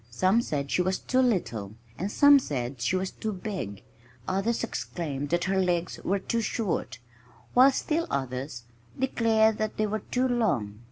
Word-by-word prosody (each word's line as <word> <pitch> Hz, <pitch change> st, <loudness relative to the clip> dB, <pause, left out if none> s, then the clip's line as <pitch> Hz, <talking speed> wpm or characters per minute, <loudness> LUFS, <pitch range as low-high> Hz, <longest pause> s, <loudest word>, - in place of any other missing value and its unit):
Some 185 Hz, -, +2 dB
said 140 Hz, -9 st, -3 dB
she -, -, +2 dB
was 185 Hz, +1 st, 0 dB
too 260 Hz, -, 0 dB
little 120 Hz, -, 0 dB, 0.2 s
and 195 Hz, +3 st, -3 dB
some 285 Hz, +2 st, +7 dB
said 125 Hz, -, -4 dB
she 125 Hz, -, +1 dB
was 185 Hz, 0 st, -1 dB
too 220 Hz, -, -4 dB
big; 185 Hz, -, -5 dB, 0.4 s
others 195 Hz, +6 st, 0 dB
exclaimed 145 Hz, -10 st, -4 dB
that 175 Hz, +1 st, +1 dB
her 190 Hz, 0 st, +1 dB
legs 175 Hz, -1 st, -1 dB
were 195 Hz, -, +1 dB
too 230 Hz, +4 st, -1 dB
short, 195 Hz, -, -2 dB, 0.6 s
while 255 Hz, +2 st, +8 dB
still 320 Hz, +5 st, -1 dB
others 130 Hz, -2 st, -3 dB, 0.3 s
declared 220 Hz, -4 st, +2 dB
that 215 Hz, 0 st, -2 dB
they 215 Hz, -, +2 dB
were 215 Hz, +1 st, -2 dB
too 250 Hz, +5 st, -1 dB
long! 145 Hz, -, 0 dB
190 Hz, 165 wpm, -27 LUFS, 140-225 Hz, 0.6 s, while